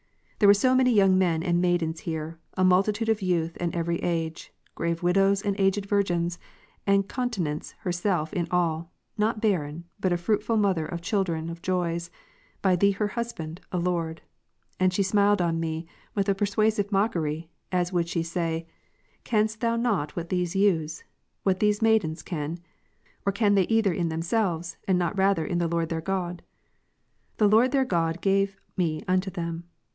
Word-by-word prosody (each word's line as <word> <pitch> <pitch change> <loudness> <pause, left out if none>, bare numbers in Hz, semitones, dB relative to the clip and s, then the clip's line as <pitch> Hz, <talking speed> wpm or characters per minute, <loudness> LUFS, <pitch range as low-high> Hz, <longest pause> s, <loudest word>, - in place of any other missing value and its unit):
There 205 - +5
were 200 - +8
so 255 +5 +3
many 255 -1 +4
young 195 -4 +5
men 165 -3 +1
and 175 -1 +1
maidens 170 -3 +1
here, 160 0 -5 0.2
a 185 - +1
multitude 200 +4 +3
of 220 -1 +1
youth 170 -3 0
and 175 0 -2
every 170 0 0
age, 165 -2 -3 0.2
grave 170 0 -2
M'idows 195 +2 +3
and 200 -1 +1
aged 195 +1 +2
virgins; 175 -4 0 0.5
and 200 0 +3
Continence 200 - -3
herself 175 -4 -1
in 175 -4 -1
all, 170 -1 0 0.3
not 215 +1 +1
barren, 170 -7 -1 0.2
but 185 -2 +1
a 175 - +2
fruitful 215 +5 0
mother 190 -7 +1
of 170 -1 -6
children 170 -4 -1
of 170 0 -9
joys, 170 -2 -1 0.5
by 190 -2 +4
Thee 200 +3 +4
her 205 +1 -1
Husband, 185 -9 -5
O 180 - -1
Lord. 170 -2 -2 0.6
And 185 0 +3
she 195 +2 +1
smiled 205 +1 +3
on 165 -1 0
me 160 0 -3 0.3
Avith 200 0 +1
a - - +4
persuasive 205 +1 +1
mockery, 170 -6 0 0.2
as 180 0 0
would 170 -1 0
she 170 -1 -1
say, 165 -1 -2 0.3
*' - - -39
Canst 220 -1 0
not 230 0 +1
thou 155 -12 +1
what 170 -1 -4
these 180 -1 -1
youths, 165 -6 +1 0.4
what 190 -1 +1
these 210 +1 +2
maidens 180 -8 +2
can? 155 -1 -4 0.7
or 200 - +1
can 205 0 +2
they 195 -3 +3
either 225 -4 +2
in 170 -1 -1
themselves, 170 0 -1
and 190 -2 +3
not 175 +2 0
rather 195 -4 +2
in 175 - -1
the 170 - +1
Lord 165 0 -1
their 160 -1 -2
God? 180 -1 -3 1.0
The 210 - +4
Lord 225 +5 +5
their 270 -1 +2
God 165 -5 0
gave 195 0 +1 0.2
me 160 -4 -1
unto 185 +1 +1
them. 170 -2 -5
180 Hz, 175 wpm, -26 LUFS, 165-200 Hz, 1.0 s, were